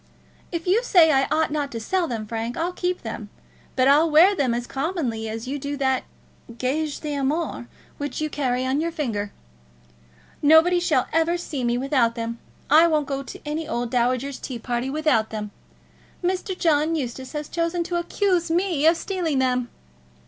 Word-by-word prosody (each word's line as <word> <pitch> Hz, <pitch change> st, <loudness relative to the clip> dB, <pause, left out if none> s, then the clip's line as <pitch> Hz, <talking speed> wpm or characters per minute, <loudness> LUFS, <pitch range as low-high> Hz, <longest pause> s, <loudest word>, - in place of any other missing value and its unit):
If 335 Hz, -1 st, -3 dB
you 385 Hz, +6 st, +3 dB
say 345 Hz, -9 st, +6 dB
I 270 Hz, -2 st, +3 dB
ought 310 Hz, 0 st, +1 dB
not 290 Hz, -2 st, -2 dB
to 230 Hz, -, -3 dB
sell 350 Hz, +10 st, 0 dB
them, 225 Hz, -5 st, -4 dB
Frank, 225 Hz, +2 st, -4 dB
I'll 345 Hz, +2 st, -1 dB
keep 360 Hz, 0 st, -2 dB
them; -, -, -6 dB, 0.5 s
but 255 Hz, 0 st, +3 dB
I'll 300 Hz, +4 st, +5 dB
wear 330 Hz, +6 st, +6 dB
them 255 Hz, -8 st, +1 dB
as 240 Hz, 0 st, -3 dB
commonly 270 Hz, -8 st, -2 dB
as 225 Hz, +2 st, -5 dB
you 285 Hz, +2 st, -3 dB
do 285 Hz, +1 st, -4 dB
that 265 Hz, -1 st, 0 dB, 0.5 s
gage 290 Hz, +4 st, -2 dB
d'amour 290 Hz, -2 st, -2 dB, 0.3 s
which 285 Hz, 0 st, -4 dB
you 310 Hz, -, 0 dB
carry 255 Hz, -4 st, -1 dB
on 265 Hz, +3 st, +1 dB
your 335 Hz, +1 st, -1 dB
finger. 225 Hz, -11 st, -3 dB, 1.1 s
Nobody 320 Hz, +4 st, +6 dB
shall 310 Hz, -7 st, +2 dB
ever 325 Hz, +2 st, +2 dB
see 300 Hz, -6 st, -4 dB
me 240 Hz, 0 st, +1 dB
without 255 Hz, -3 st, +1 dB
them. 230 Hz, 0 st, -4 dB, 0.3 s
I 315 Hz, +4 st, +6 dB
won't 305 Hz, -3 st, +1 dB
go 275 Hz, 0 st, -3 dB
to 275 Hz, -, -9 dB
any 305 Hz, +1 st, -3 dB
old 240 Hz, -6 st, -2 dB
dowager's 255 Hz, +2 st, 0 dB
tea 255 Hz, -, -5 dB
party 240 Hz, +2 st, -2 dB
without 290 Hz, -7 st, +1 dB
them. 210 Hz, -1 st, -5 dB, 0.7 s
Mr. 370 Hz, +1 st, -1 dB
John 320 Hz, -1 st, +2 dB
Eustace 260 Hz, -2 st, -4 dB
has 300 Hz, -1 st, -4 dB
chosen 335 Hz, +1 st, -1 dB
to 350 Hz, 0 st, -2 dB
accuse 345 Hz, 0 st, 0 dB
me 335 Hz, -3 st, +2 dB
of 330 Hz, +1 st, +5 dB
stealing 345 Hz, -6 st, -2 dB
them." 250 Hz, -2 st, +1 dB
290 Hz, 180 wpm, -24 LUFS, 250-330 Hz, 1.1 s, say